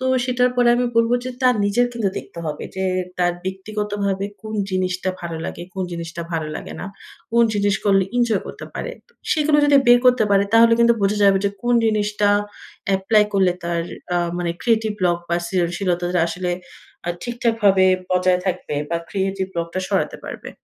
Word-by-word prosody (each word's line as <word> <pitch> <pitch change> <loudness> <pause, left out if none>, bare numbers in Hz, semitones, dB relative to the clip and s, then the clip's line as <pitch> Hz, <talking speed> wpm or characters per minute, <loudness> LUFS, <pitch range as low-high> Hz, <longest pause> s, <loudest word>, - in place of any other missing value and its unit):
তো 260 - -4 0.2
সেটার 250 0 +2
পরে 245 -1 +4
আমি 245 0 +1
বলব, 230 0 +4
যে 255 - -3
তার 250 -1 +5
নিজের 225 +5 +2
কিন্তু 225 -4 0
দেখতে - - -11
হবে। 150 - -4
যে 190 - -1 0.3
তার 175 0 +2
ব্যক্তিগতভাবে 200 0 -3 0.2
কোন 215 0 -6 0.2
জিনিসটা 185 0 -1
ভালো 170 -1 -5
লাগে, - - -5
কোন 190 - -2
জিনিসটা 170 0 -5
ভালো 160 -2 -1
লাগে - - -8
না। - - -5 0.5
কোন 235 0 +5
জিনিস 205 -1 +2
করলে 195 -2 +4
ইনজয় 235 -5 +2
করতে - - -8
পারে। - - -4 0.2
তো - - -28 0.2
সেগুলো 300 -1 +3
যদি 290 -1 +5
বের 245 0 +8
করতে 250 -3 +5
পারে, 200 0 +4
তাহলে 230 0 +6
কিন্তু 235 0 +5
বোঝা 200 +1 +2
যাবে 195 -1 +5
যে 200 - +2
কোন 240 0 +2
জিনিসটা 210 -1 +1 0.7
এপ্লাই 210 +2 +3
করলে, 190 -2 +3
তার 170 -1 -1 0.3
আ - - +3 0.2
মানে 175 -1 -1
ক্রিয়েটিভ 220 -2 +2
ব্লক 175 -2 +2
বা 170 - +1
সৃজনশীলতাটা 175 0 0
আসলে 180 +1 -3 0.6
আ - - -1
ঠিকঠাকভাবে 225 -5 +2 0.3
বজায় 180 0 +2
থাকবে 175 -5 -2 0.2
বা 170 - +1
ক্রিয়েটিভ 195 -1 -2
ব্লক 170 0 -1
টা 185 - 0
সরাতে - - 0
পারবে। - - -7
200 Hz, 180 wpm, -21 LUFS, 180-230 Hz, 0.7 s, বের